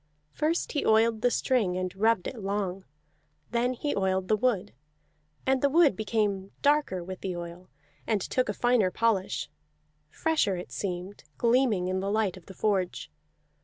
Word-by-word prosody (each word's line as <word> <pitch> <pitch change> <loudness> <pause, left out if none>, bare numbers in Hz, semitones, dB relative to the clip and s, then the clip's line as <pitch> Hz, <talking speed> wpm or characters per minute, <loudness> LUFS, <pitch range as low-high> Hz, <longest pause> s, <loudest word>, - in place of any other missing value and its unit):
First 315 +3 -1
he 290 - -1
oiled 220 0 +3
the 245 - +4
string 225 -8 +1
and 185 0 -3
rubbed 220 -1 +2
it 245 - -5
long; 195 -2 -3 0.7
then 240 +2 +1
he 290 +4 -2
oiled 190 -1 0
the 215 - +5
wood. 210 - 0 0.7
And 265 0 +2
the 280 - +3
wood 310 - +5
became 205 -2 -1
darker 285 -11 +2
with 185 +1 -7
the 185 -2 -3
oil, 175 +1 -8 0.4
and 215 -2 +2
took 255 +5 -1
a - - 0
finer 240 -4 +2
polish; 205 -2 0 0.6
fresher 310 -12 +1
it 175 -8 -7
seemed, 180 +7 -5
gleaming 235 -6 +2
in 185 0 -1
the 195 +1 -2
light 210 -3 +1
of 185 -3 -15
the 190 - -11
forge. 185 - -1
205 Hz, 165 wpm, -28 LUFS, 185-245 Hz, 0.7 s, the